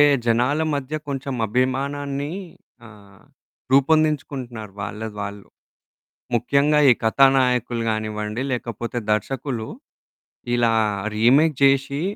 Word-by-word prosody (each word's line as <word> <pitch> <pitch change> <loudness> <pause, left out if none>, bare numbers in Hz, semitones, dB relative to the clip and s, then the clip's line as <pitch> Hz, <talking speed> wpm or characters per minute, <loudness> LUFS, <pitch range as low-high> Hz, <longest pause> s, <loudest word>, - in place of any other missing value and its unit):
అంటే - - +8 0.2
జనాల 125 +6 +2
మధ్య 140 +1 -4
కొంచెం 135 -1 -4
అభిమానాన్ని 140 +4 -2 0.5
ఆహ్, 100 -3 -17 0.5
రూపొందించుకుంటున్నారు 135 -6 +1
వాళ్ళది 105 +2 -6
వాళ్ళు. 100 0 -7 0.9
ముఖ్యంగా 140 +5 +2
ఈ - - +7
కథానాయకులు 125 -1 +3
కానివ్వండి, 110 +1 -3
లేకపోతే 120 -1 -4
దర్శకులు 120 +2 -2 0.9
ఇలా 115 -1 +3 0.4
రీమేక్ 140 +6 +4
జేసి 140 +1 +2
125 Hz, 90 wpm, -22 LUFS, 110-140 Hz, 0.9 s, అంటే